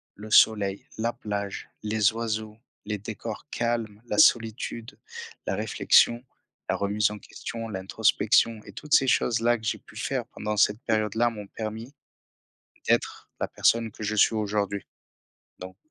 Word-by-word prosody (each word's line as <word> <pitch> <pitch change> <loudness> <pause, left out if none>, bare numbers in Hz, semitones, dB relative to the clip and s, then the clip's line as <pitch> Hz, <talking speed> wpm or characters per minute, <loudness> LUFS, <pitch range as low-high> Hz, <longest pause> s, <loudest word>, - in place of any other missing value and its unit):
le 105 +2 -10
soleil, 100 -3 +4
la 115 +2 -1
plage, 100 -3 -5
les 105 0 +2
oiseaux, 110 -1 -3 0.3
les 105 0 -2
décors 110 +5 -7
calmes, 115 -3 -2
la - - -2
solitude, 115 -3 +2 0.5
la - - 0
réflexion, 120 +1 +3 0.5
la - - +2
remise 105 +1 +1
en 105 - -7
question, 115 -1 -7
l'introspection 105 +3 +2
et - - -10
toutes 150 0 -5
ces 135 - +6
choses-là 120 -1 +2
que 110 - -16
j'ai 110 - -1
pu - - -19
faire - - -2
pendant 105 0 -4
cette 105 +1 +3
période-là 110 +1 +1
m'ont 105 -3 -8
permis 110 +5 -6 0.9
d'être - - 0
la - - -1
personne 115 -1 +2
que 110 - -9
je 105 +1 -1
suis 110 +2 +4
aujourd'hui. 100 -2 -1 0.7
Donc, 95 0 -9
110 Hz, 145 wpm, -26 LUFS, 105-115 Hz, 0.9 s, ces